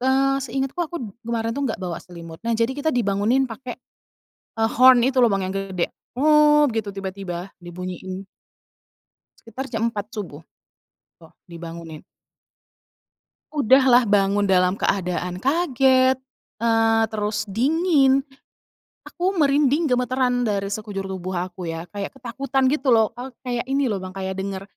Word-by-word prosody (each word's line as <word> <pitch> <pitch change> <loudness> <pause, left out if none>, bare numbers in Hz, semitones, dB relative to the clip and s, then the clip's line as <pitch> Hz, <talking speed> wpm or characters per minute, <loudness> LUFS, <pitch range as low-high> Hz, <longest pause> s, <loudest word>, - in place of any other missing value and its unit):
eee, 270 +1 +2
seingatku 270 +2 -3
aku 345 0 -3 0.3
kemarin 230 -1 -2
tuh 280 - -1
nggak 220 - -4
bawa 175 -3 -4
selimut. 170 -2 -11
Nah, 235 - 0
jadi 230 +3 +1
kita 300 +2 0
dibangunin 225 +3 +1
pakai, 245 +2 -7 0.8
eee, 225 0 +2
horn 255 -1 +7
itu 265 -1 +1
loh, 230 - +4
Bang, 195 -1 0
yang 190 - -5
gede, 190 -3 -2 0.3
"Ngop!" 300 -1 +5
Gitu, 215 -2 -2
tiba-tiba, 190 -2 -5 0.2
dibunyiin. 185 +2 -6 1.2
Sekitar 245 +4 -7
jam 225 -2 -2
4.00 210 -3 -5
subuh, 170 -8 -7 0.8
eee, 165 - -16 0.2
dibangunin. 165 -2 -9 1.5
Udah 275 -2 +4
lah 250 -1 +6
bangun 200 0 +2
dalam 185 0 +3
keadaan 180 -1 -1
kaget, 265 -3 +3 0.5
eee, 225 -1 +3
terus 210 0 -2
dingin, 275 - +3 0.8
aku 375 +2 -2
merinding 290 0 +3
gemetaran 250 0 +1
dari 200 -2 -1
sekujur 205 -2 -4
tubuh 190 -1 -5
aku 180 0 -4
ya, 165 +1 -4
kayak 200 -1 -5
ketakutan 265 +2 -2
gitu 285 -2 -1
loh, 220 -1 +3
eee, 255 +2 -6
kayak 245 -1 -2
ini 275 +1 +1
loh, 195 - -2
Bang, 185 0 -8
kayak 190 0 -3
denger 195 0 -4
225 Hz, 140 wpm, -22 LUFS, 190-265 Hz, 1.5 s, horn